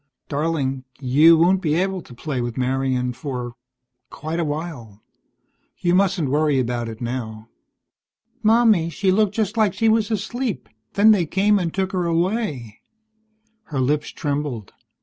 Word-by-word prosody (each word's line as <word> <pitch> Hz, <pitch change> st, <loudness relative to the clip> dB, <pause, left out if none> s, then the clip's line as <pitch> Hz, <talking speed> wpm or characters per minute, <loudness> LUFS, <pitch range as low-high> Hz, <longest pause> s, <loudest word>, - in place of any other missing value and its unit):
"Darling, 140 Hz, -3 st, -1 dB, 0.2 s
you 150 Hz, +5 st, +5 dB
won't 180 Hz, +3 st, +3 dB
be 155 Hz, -3 st, 0 dB
able 190 Hz, +1 st, 0 dB
to 125 Hz, -, -14 dB
play 130 Hz, 0 st, -3 dB
with 120 Hz, 0 st, -4 dB
Marian 130 Hz, -1 st, 0 dB
for 125 Hz, -3 st, -5 dB, 0.6 s
quite 160 Hz, +3 st, -5 dB
a -, -, +1 dB
while. 145 Hz, -9 st, -6 dB, 0.7 s
You 175 Hz, -1 st, 0 dB
mustn't 185 Hz, -4 st, +2 dB
worry 150 Hz, -1 st, +2 dB
about 120 Hz, -2 st, -1 dB
it 110 Hz, +1 st, -9 dB
now." 115 Hz, -2 st, -5 dB, 0.9 s
"Mommy, 220 Hz, -6 st, +4 dB
she 185 Hz, +4 st, 0 dB
looked 205 Hz, +1 st, +2 dB
just 220 Hz, 0 st, -1 dB
like 215 Hz, -4 st, +2 dB
she 225 Hz, -1 st, +2 dB
was 220 Hz, -1 st, +2 dB
asleep, 225 Hz, +1 st, -3 dB, 0.3 s
then 210 Hz, +2 st, +6 dB
they 185 Hz, -6 st, +2 dB
came 200 Hz, +4 st, +2 dB
and 170 Hz, -3 st, -2 dB
took 190 Hz, +1 st, -2 dB
her 180 Hz, -2 st, -1 dB
away." 170 Hz, -, -2 dB, 0.8 s
Her 145 Hz, -4 st, -4 dB
lips 145 Hz, +3 st, 0 dB
trembled. 140 Hz, -8 st, -4 dB
160 Hz, 150 wpm, -22 LUFS, 130-190 Hz, 0.9 s, then